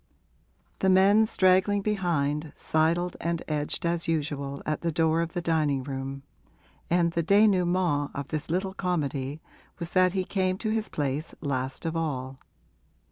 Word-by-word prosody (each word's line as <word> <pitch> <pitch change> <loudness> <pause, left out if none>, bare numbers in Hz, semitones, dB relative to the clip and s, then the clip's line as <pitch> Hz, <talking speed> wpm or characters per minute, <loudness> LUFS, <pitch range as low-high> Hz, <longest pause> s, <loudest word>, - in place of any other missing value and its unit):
The 190 - +2
men, 200 +4 +5
straggling 190 +1 +3
behind, 160 -7 -1
sidled 170 +3 +1
and 170 0 -2
edged 150 +1 -1
as 170 0 0
usual 145 -3 -2
at 155 - -2
the 170 - 0
door 160 +1 +2
of 170 0 -3
the 175 -2 -3
dining 150 -5 +1
room, 135 0 -5 0.7
and 170 0 +3
the 170 - 0
dénouement 180 -6 +3
of 140 0 -5
this 155 0 -3
little 190 +3 -1
comedy 150 -6 -2 0.3
was 170 -1 -5
that 185 -1 +3
he 190 -1 0
came 185 -1 0
to 215 +1 -2
his 220 -1 -1
place 145 +1 -3
last 130 -1 -3
of 165 0 -2
all. 135 -5 -3
165 Hz, 150 wpm, -27 LUFS, 145-185 Hz, 0.7 s, men